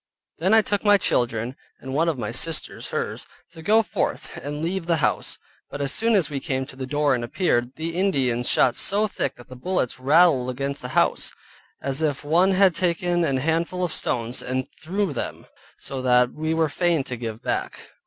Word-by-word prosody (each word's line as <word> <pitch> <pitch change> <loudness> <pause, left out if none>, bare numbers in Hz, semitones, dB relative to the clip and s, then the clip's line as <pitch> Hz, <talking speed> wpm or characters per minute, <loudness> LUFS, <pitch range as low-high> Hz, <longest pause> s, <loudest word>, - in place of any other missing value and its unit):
Then 190 +6 +3
I 220 - +6
took 205 -1 -1
my 205 -1 +6
children 120 - 0 0.2
(and 130 0 -7
one 165 +4 +2
of 155 - -2
my 110 -3 -3
sisters', 160 +6 -2
hers) - - -4 0.2
to 165 -1 -11
go 215 +7 +4
forth - - -3
and 145 +3 -5
leave 175 0 -2
the 170 - +3
house: 140 -6 0 0.3
but 145 - -7
as 140 -1 -1
soon 225 +5 +2
as 190 -5 +3
we 145 -2 -3
came 130 0 -2
to 130 - -12
the 130 -1 -5
door 145 0 +2
and 120 -2 -1
appeared, 120 -3 0
the 165 +2 -4
Indians 135 -11 +1
shot 125 - +4
so 210 +2 +3
thick 140 -9 -3
that 120 - -15
the 130 - -10
bullets 130 -2 -1
rattled 140 -2 +4
against 140 +2 -3
the 125 - -5
house, - - +2 0.5
as 135 +2 0
if 150 -3 -1
one 175 +6 +3
had 190 -1 +5
taken 175 0 +1
an 140 -5 +1
handful 165 +5 0
of 175 - -1
stones 120 +1 -1
and 130 +1 -2
threw 190 +1 -1
them, - - -5 0.3
so 135 -1 -5
that 125 -1 +3
we 155 +1 -2
were 160 -1 +2
fain 170 -1 +1
to 130 - -5
give 115 -2 -6
back. - - -3
150 Hz, 205 wpm, -24 LUFS, 130-175 Hz, 0.5 s, I